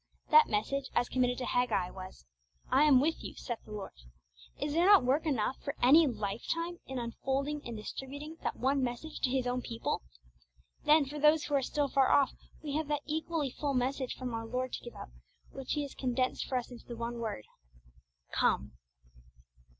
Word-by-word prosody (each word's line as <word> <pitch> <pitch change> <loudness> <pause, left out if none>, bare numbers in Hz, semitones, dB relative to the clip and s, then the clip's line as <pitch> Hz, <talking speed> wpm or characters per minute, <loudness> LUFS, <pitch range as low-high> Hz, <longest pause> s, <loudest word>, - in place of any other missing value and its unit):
That 460 0 +8
message, 265 +6 -1
as 240 0 +3
committed 250 -1 +1
to 255 - -3
Haggai, 225 -9 +1
was, 185 - -10 0.5
'I 265 +3 +5
am 280 -4 +7
with 315 +4 0
you, - - -7
saith 240 -3 -5
the - - -13
Lord.' 205 -2 -6 0.7
Is 290 - -2
there 340 +3 +4
not 405 -8 +8
work 285 +6 +2
enough 260 -3 0
for 280 0 -3
any 300 +6 +7
lifetime 265 - -3
in 265 - -5
unfolding 270 +5 -2
and 235 -2 -5
distributing 285 +8 -7
that - - -2
one 270 +2 +1
message 255 +5 -4
to 260 - +1
His 260 -1 0
own 250 0 -1
people? 230 -1 -3 0.8
Then, 300 0 +6
for 295 +2 -6
those 300 +1 +5
who 295 - -4
are 280 - +4
still 290 +2 0
far 270 -1 +3
off, 280 -2 +4 0.3
we 290 -2 -4
have 310 -1 -2
that 295 -1 -1
equally 315 -2 -1
full 280 +1 -2
message 255 +1 -1
from 250 -2 -5
our 225 0 -4
Lord 255 +2 -2
to - - -4
give 240 - -9
out, - - -9 0.4
which 270 -1 -4
He 295 - 0
has 280 - -7
condensed 255 0 -1
for 260 - 0
us 250 0 -4
into 245 - -11
the 235 - -7
one 235 +1 -4
word, 220 - -4 0.9
'Come!' - - +1
265 Hz, 195 wpm, -32 LUFS, 240-295 Hz, 0.9 s, That